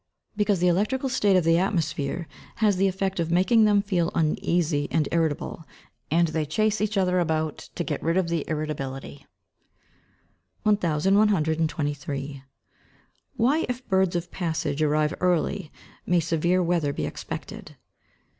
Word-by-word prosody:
_ - - -51 0.3
Because 205 -2 +1
the 180 - +3
electrical 215 +10 +1
state 205 -6 +2
of 180 - +2
the 165 +1 +4
atmosphere 170 -4 -1 0.3
has 210 -4 +2
the 195 +1 +3
effect 190 0 -2
of 165 -1 -1
making 190 +6 +4
them 205 -1 +3
feel 180 -5 0
uneasy 155 -1 +1
and 155 -3 +1
irritable, 165 -1 -1 0.5
and 165 +2 +3
they 155 0 -1
chase 215 +8 0
each 210 0 0
other 185 -1 +2
about 160 -2 -1 0.2
to 175 - -2
get 150 -4 -3
rid 165 +2 0
of 185 -2 +1
the 170 -3 -1
irritability. 140 -3 -5 1.4
1123. 160 -7 +1 1.0
_Why 275 +8 +2
if 250 +1 -5
birds 190 -2 +2
of 175 0 -3
passage 160 -4 -2
arrive 150 +1 +2
early, 180 -1 0 0.4
may 175 0 +3
severe 170 +3 +1
weather 165 -4 0
be - - -3
expected? - - -7
170 Hz, 140 wpm, -25 LUFS, 155-195 Hz, 1.4 s, the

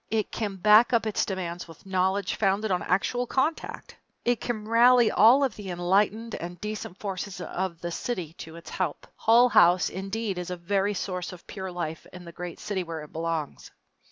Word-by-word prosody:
It 220 -1 -1
can 205 -3 -3
back 210 +6 +5
up 230 -1 +3
its 215 - 0
demands 180 -3 -4
with 165 +1 -15
knowledge 190 +1 0
founded 200 +1 +1
on 180 - +1
actual 245 +7 0
contact. 285 +7 -2 0.3
It 245 -1 +1
can 215 -3 -3
rally 235 0 +5
all 240 +7 +6
of 270 - 0
the 205 -3 -8
enlightened 200 +6 +1
and 175 +1 -6
decent 210 -3 -5
forces 195 -1 -5
of 180 -1 -4
the 175 - -4
city 175 -5 -4
to 160 0 -9
its 170 - -11
help. 180 -6 -3
Hull 235 +3 +5
House, 175 -4 +5
indeed, 195 +1 -3
is 180 - -5
a 180 - -4
very 200 +3 0
source 180 0 -3
of 180 -2 -12
pure 190 -2 -6
life 165 -3 -5
in 180 -1 -11
the 170 - -9
great 175 0 -7
city 205 -3 -2
where 165 -3 -6
it 150 - -14
belongs. 165 -2 -3
190 Hz, 190 wpm, -27 LUFS, 175-215 Hz, 0.3 s, all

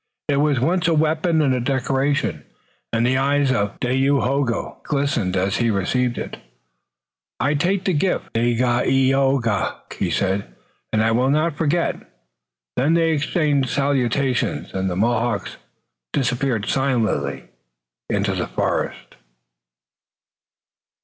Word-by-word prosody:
It 140 - +2
was 145 -1 +2
at 120 - 0
once 175 +3 +1
a 165 - +3
weapon 160 +1 +2
and 135 -3 +2
a 125 - 0
decoration, 135 +2 0 0.5
and 115 +1 +1
the 130 +1 +2
eyes 140 0 +2
of 105 -5 -1
Dayohogo 135 -1 0
glistened 140 -10 -1
as 95 +3 0
he 120 -1 +1
received 120 +5 0
it. - - -5 1.0
"I 145 - +1
take 180 +6 0
the 185 - +2
gift, 180 +5 -1
Dagaeoga," 125 0 +2 0.2
he - - 0
said, 95 -10 -1 0.4
"and 110 0 +2
I 110 - +2
will 125 +3 +2
not 155 +2 +1
forget." 165 +3 0 0.8
Then 155 +5 +3
they 165 -1 +3
exchanged 145 -3 +1
salutations, 135 -2 0
and 95 0 -1
the 90 - -3
Mohawks 115 0 0 0.6
disappeared 125 -4 0
silently 130 -4 0 0.7
in - - 0
the - - -1
forest. - - -3
135 Hz, 125 wpm, -21 LUFS, 120-145 Hz, 1.0 s, a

